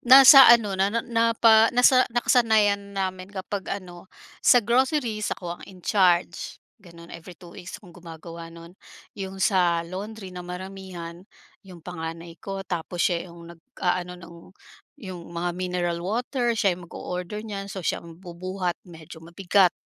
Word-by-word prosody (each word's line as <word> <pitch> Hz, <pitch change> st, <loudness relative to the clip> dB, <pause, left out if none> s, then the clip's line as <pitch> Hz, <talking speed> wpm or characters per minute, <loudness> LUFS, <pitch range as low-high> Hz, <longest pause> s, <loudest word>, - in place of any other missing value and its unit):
nasa 270 Hz, +2 st, +9 dB
ano 230 Hz, -4 st, +5 dB
na 195 Hz, +1 st, +3 dB
na 230 Hz, +2 st, -2 dB
na 230 Hz, -1 st, +1 dB
pa 225 Hz, -1 st, +6 dB
nasa 255 Hz, +1 st, +5 dB
nakasanayan 215 Hz, -4 st, +2 dB
namin 185 Hz, -1 st, -3 dB
kapag 200 Hz, 0 st, -6 dB
ano, 185 Hz, -2 st, -7 dB, 0.3 s
sa 245 Hz, -4 st, +5 dB
groceries 240 Hz, -3 st, 0 dB
ako 175 Hz, -1 st, -7 dB
ang -, -, -11 dB
in 185 Hz, -2 st, -15 dB
charge, 180 Hz, -4 st, +1 dB, 0.2 s
gano'n 170 Hz, -2 st, -14 dB
every 170 Hz, +1 st, -11 dB
2 175 Hz, -2 st, -14 dB
weeks 175 Hz, 0 st, -9 dB
akong 180 Hz, -4 st, -16 dB
gumagawa 165 Hz, -1 st, -10 dB
nun. 170 Hz, +1 st, -13 dB, 0.4 s
'Yong 195 Hz, -2 st, -7 dB
sa 175 Hz, -3 st, +2 dB
laundry 195 Hz, +2 st, -8 dB
na 180 Hz, -, -7 dB
maramihan, 180 Hz, -1 st, -8 dB, 0.4 s
'yong 180 Hz, -5 st, -15 dB
panganay 165 Hz, -1 st, -7 dB
ko 195 Hz, -1 st, -6 dB
tapos 175 Hz, -1 st, -3 dB
siya 175 Hz, 0 st, -1 dB
'yong 170 Hz, 0 st, -12 dB
nag-aano 180 Hz, -1 st, -3 dB
ng 170 Hz, -1 st, -13 dB, 0.7 s
'yong 185 Hz, -2 st, -7 dB
mga 170 Hz, +1 st, -3 dB
mineral 180 Hz, -1 st, -2 dB
water, 240 Hz, +5 st, -1 dB
siya 200 Hz, -3 st, +2 dB
ang 175 Hz, 0 st, -9 dB
mag-o-order 180 Hz, +6 st, -6 dB
niyan 200 Hz, -2 st, -6 dB
so 190 Hz, -2 st, -7 dB
siya -, -, -1 dB
ang 165 Hz, -1 st, -13 dB
bubuhat, 180 Hz, 0 st, -5 dB
medyo 160 Hz, -1 st, -12 dB
mabigat. 175 Hz, +2 st, +2 dB
185 Hz, 155 wpm, -24 LUFS, 170-205 Hz, 0.7 s, nasa